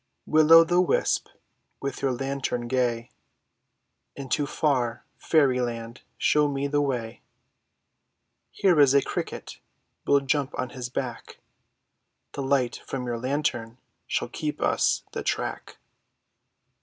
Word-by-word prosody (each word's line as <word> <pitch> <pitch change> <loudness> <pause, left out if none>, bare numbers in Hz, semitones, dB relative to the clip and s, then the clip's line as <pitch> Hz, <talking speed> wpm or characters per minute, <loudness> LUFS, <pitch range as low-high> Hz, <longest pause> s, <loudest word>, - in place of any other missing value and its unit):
W 155 0 +4
IXX 155 - +1
O' 165 0 +11
THE 175 +2 +3
WISP, 180 - +1 0.5
with 140 0 -5
your 135 -1 +1
lantern 135 -2 -3
gay, 120 -2 -1 1.0
Into 140 +2 -2
far 125 -6 0
fairy 135 -6 +2
land 115 0 -5 0.2
show 150 0 +3
me 140 -1 -2
the 145 +1 +1
way; 120 -5 -3 1.3
Here 180 -5 +2
is 140 -1 +6
a 140 - +5
cricket, - - -5 0.5
we'll 140 0 +4
jump 140 0 -1
on 130 - -2
his 125 -2 -6
back, 125 -1 -5 0.9
The 140 - -5
light 135 -2 0
from 130 -2 -4
your 120 -1 -3
lantern 120 -3 -2 0.3
shall - - -1
keep - - -4
us - - +1
the - - -4
track. - - -3
135 Hz, 130 wpm, -26 LUFS, 120-145 Hz, 1.3 s, O